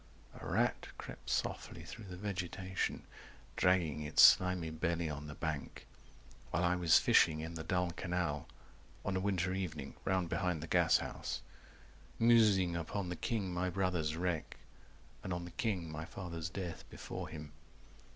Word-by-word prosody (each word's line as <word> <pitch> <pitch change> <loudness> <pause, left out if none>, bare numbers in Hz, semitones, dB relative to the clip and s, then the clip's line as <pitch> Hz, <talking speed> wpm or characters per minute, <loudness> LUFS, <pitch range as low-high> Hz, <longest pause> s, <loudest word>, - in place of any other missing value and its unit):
A - - -12
rat - - +1
crept - - -9
softly - - -2
through 115 - -9
the 90 -2 -8
vegetation 95 -1 -3 0.5
Dragging 85 -5 +2
its 75 0 +5
slimy 90 -3 +6
belly 85 0 -1
on 75 0 -6
the 75 - -7
bank 80 -3 -4 0.6
While 85 - 0
I 90 0 +3
was 85 -3 +6
fishing 80 -1 +5
in 80 +2 -5
the 80 -1 -5
dull 90 +2 0
canal 85 -5 -2 0.6
On 100 - 0
a - - +2
winter 95 -2 0
evening 80 -7 -4
round 95 -2 +1
behind 90 -2 -1
the - - -6
gashouse. - - +1 0.7
190 115 - +1
Musing 105 -7 +5
upon 90 +3 -3
the 90 - -3
king 100 -2 -2
my 90 +1 0
brother's 90 -4 0
wreck 85 -2 -2 0.7
And 95 - -4
on 85 -1 -2
the 90 - -9
king 90 -8 -2
my 80 +1 -5
father's 85 -2 -5
death 90 -2 -5
before - - -6
him. 75 -2 -8
90 Hz, 155 wpm, -35 LUFS, 80-95 Hz, 0.7 s, slimy